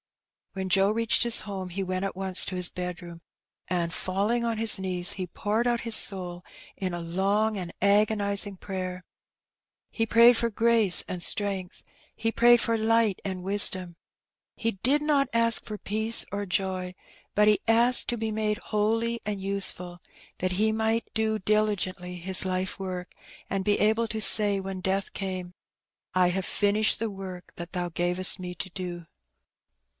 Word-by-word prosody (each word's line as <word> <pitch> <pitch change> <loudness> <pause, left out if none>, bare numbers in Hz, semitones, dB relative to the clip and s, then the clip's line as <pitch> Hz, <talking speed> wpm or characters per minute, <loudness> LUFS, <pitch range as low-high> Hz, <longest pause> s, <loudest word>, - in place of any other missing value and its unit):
'' - - -53
When 190 -1 -4
Joe 195 +2 +3
reached 225 +1 +2
his 235 -1 +6
home, 190 -3 -6
he 195 +2 -4
went 185 0 -3
at 195 - -3
once 190 -1 +1
to 185 - -4
his 180 -1 +1
bed 180 -1 -5
room, 170 -1 -11 0.5
and 170 -1 -1
falling 205 +7 -1
on 230 -1 -1
his 220 -3 +3
knees, 180 -2 +2
he 185 -2 -5
poured 210 +6 -2
out 240 -1 0
his 230 -2 +3
soul 180 -3 +1 0.3
in 185 -2 -4
a 175 - -4
long 195 +6 0
and 180 -3 -5
agonizing 200 0 +1
prayer. 185 -1 -5 0.9
He 225 - -1
prayed 235 +2 +6
for 235 0 +1
grace 225 -3 +2
and 180 - -5
strength, 195 -3 0 0.3
he 225 0 -1
prayed 240 0 +5
for 230 0 +1
light 225 -2 +2
and 185 -2 -5
wisdom. 190 -3 +2 0.6
He 230 - -1
did 260 +9 +1
not 285 -3 +2
ask 230 0 +3
for 215 - -7
peace 220 +3 -1
or 205 0 -2
joy, 185 -1 -2 0.4
but 210 0 +3
he 210 -1 +3
asked 235 +2 +4
to 240 - -1
be 220 -1 -3
made 215 -1 -1
holy 225 +1 -1
and 205 -1 -3
useful, 190 -2 -3 0.4
that 185 0 -1
he 215 +4 +1
might 225 +1 0
do 220 -1 0
diligently 190 -3 -1
his 185 +2 0
life 185 0 -2
work, 185 -1 -6 0.4
and 195 -1 -2
be 205 +1 +1
able 220 +2 +2
to 220 - -3
say 205 -1 +5
when 190 -1 -6
death 190 +1 -1
came, 185 -2 -5 0.6
"I 185 -1 +3
have 190 +1 -2
finished 210 +1 +2
the 225 0 -1
work 190 -2 -9
that 170 0 -8
Thou 180 -1 -2
gavest 175 +3 -1
me 180 -1 -6
to 185 - -4
do." 175 -2 -6
195 Hz, 170 wpm, -26 LUFS, 185-220 Hz, 0.9 s, his